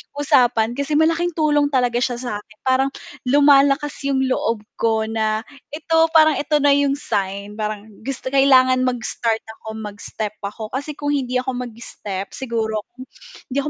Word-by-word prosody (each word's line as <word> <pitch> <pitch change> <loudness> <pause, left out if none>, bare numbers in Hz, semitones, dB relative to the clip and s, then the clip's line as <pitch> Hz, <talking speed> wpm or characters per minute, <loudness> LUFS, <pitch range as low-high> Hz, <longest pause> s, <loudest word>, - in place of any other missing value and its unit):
usapan 245 -5 +3
kasi 280 +1 -1
malaking 330 +2 +2
tulong 295 -2 +2
talaga 245 -3 +1
siya 245 -1 0
sa'kin 215 -2 -7
parang 260 +1 +2 0.4
lumalakas 285 +1 +4 0.2
yung 265 -1 +1
loob 230 -4 -1 0.2
ko 220 -1 +2
na 220 0 -1 0.3
ito 325 +1 0 0.2
parang 315 -1 +6
ito 300 +1 0
na 285 - +5
yung 280 0 +3
sign 200 -4 -3
parang 215 0 -4 0.2
gus 270 -3 -4
kailangan 260 -1 +4
mag-start 230 -2 -1 0.2
ako, - - -14 0.2
mag-step 210 +1 -5
ako 215 +2 -6
kasi 285 +3 -4
kung 290 0 -4
hindi 255 -3 0
ako 255 -1 -4
mag-step, 210 -4 -7
siguro 225 -4 -3 0.2
kung 255 - -10 0.5
hindi 265 - -3
ako 290 +2 0
255 Hz, 155 wpm, -21 LUFS, 220-285 Hz, 0.5 s, parang